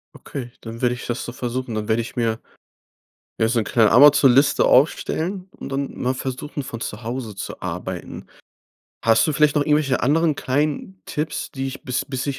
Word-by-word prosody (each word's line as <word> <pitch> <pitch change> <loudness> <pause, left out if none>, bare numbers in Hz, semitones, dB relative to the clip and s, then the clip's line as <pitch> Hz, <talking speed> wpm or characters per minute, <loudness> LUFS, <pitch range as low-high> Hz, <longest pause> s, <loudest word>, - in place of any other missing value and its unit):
Okay, 125 -4 -7
dann 115 0 -8
werde 125 -1 +2
ich 120 - -8
das 120 0 -3
so - - -5
versuchen. 125 0 -4
Dann 105 -1 -3
werde 110 +1 +2
ich 115 - -8
mir, 115 -2 0 1.0
ja, 110 - +3
so 120 - +1
’ne 110 - +1
kleine 110 -2 +3
Amazon-Liste 140 +1 +6
aufstellen 180 +7 +2
und - - -7
dann 140 0 -3
mal 125 +1 0
versuchen, 135 +3 -5
von 115 -3 -7
zu 105 -2 -5
Hause 115 -2 -5
zu 95 - -7
arbeiten. 90 0 -6 0.8
Hast 115 0 +5
du 155 - 0
vielleicht 150 -1 +3
noch 145 - +3
irgendwelche 150 -3 +2
anderen 155 +3 +3
kleinen 150 +8 -2
Tipps, 150 -1 -3
die 135 -1 -3
ich 135 - -7
bis 130 -4 -2
bis 130 -1 -4
ich 140 -2 -2
130 Hz, 190 wpm, -22 LUFS, 115-145 Hz, 1.0 s, Amazon-Liste